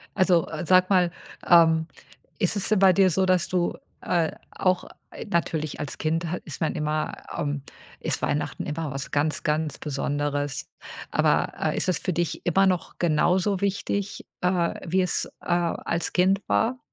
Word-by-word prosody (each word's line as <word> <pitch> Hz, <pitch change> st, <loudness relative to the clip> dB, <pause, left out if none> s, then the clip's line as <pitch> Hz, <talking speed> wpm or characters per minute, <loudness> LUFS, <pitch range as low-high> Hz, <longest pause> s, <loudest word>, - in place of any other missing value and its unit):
Also, 185 Hz, -4 st, +3 dB
äh, 160 Hz, +2 st, -5 dB
sag 185 Hz, +1 st, +5 dB
mal, 180 Hz, -3 st, +3 dB, 0.4 s
ähm, 160 Hz, -2 st, +5 dB, 0.5 s
ist 190 Hz, -1 st, +1 dB
es 200 Hz, -, -2 dB
denn 215 Hz, -2 st, +3 dB
bei 190 Hz, -1 st, +6 dB
dir 190 Hz, +1 st, +5 dB
so, 190 Hz, +3 st, +2 dB
dass 185 Hz, -1 st, +2 dB
du, 180 Hz, -1 st, 0 dB, 0.2 s
äh, 170 Hz, -3 st, +1 dB, 0.2 s
auch 185 Hz, -1 st, 0 dB, 0.3 s
äh, -, -, -8 dB
natürlich 165 Hz, -6 st, -1 dB
als 150 Hz, -, -5 dB
Kind 165 Hz, +2 st, -1 dB
hat 180 Hz, -, -3 dB
ist 150 Hz, -, -8 dB
man 160 Hz, -, +1 dB
immer, 150 Hz, 0 st, -1 dB, 0.2 s
ähm 145 Hz, -1 st, -2 dB, 0.4 s
ist -, -, -2 dB
Weihnachten 150 Hz, -, -2 dB
immer 150 Hz, 0 st, -3 dB
was 135 Hz, +1 st, -5 dB
ganz, 150 Hz, +1 st, 0 dB
ganz 155 Hz, -1 st, -1 dB
Besonderes. 145 Hz, 0 st, -2 dB, 0.4 s
Aber, -, -, +2 dB
äh, -, -, 0 dB
ist -, -, 0 dB
es 180 Hz, -, +2 dB
für 185 Hz, -, -2 dB
dich 170 Hz, 0 st, -2 dB
immer 190 Hz, +3 st, +4 dB
noch 180 Hz, -2 st, -1 dB
genauso 180 Hz, +4 st, +2 dB
wichtig, 200 Hz, 0 st, -2 dB, 0.2 s
äh, 180 Hz, -2 st, +1 dB
wie 185 Hz, +2 st, +2 dB
es, 180 Hz, -, 0 dB, 0.2 s
äh, -, -, -16 dB
als 170 Hz, -1 st, -1 dB
Kind 190 Hz, +2 st, +3 dB
war? 245 Hz, +3 st, +1 dB
175 Hz, 170 wpm, -25 LUFS, 155-185 Hz, 0.5 s, bei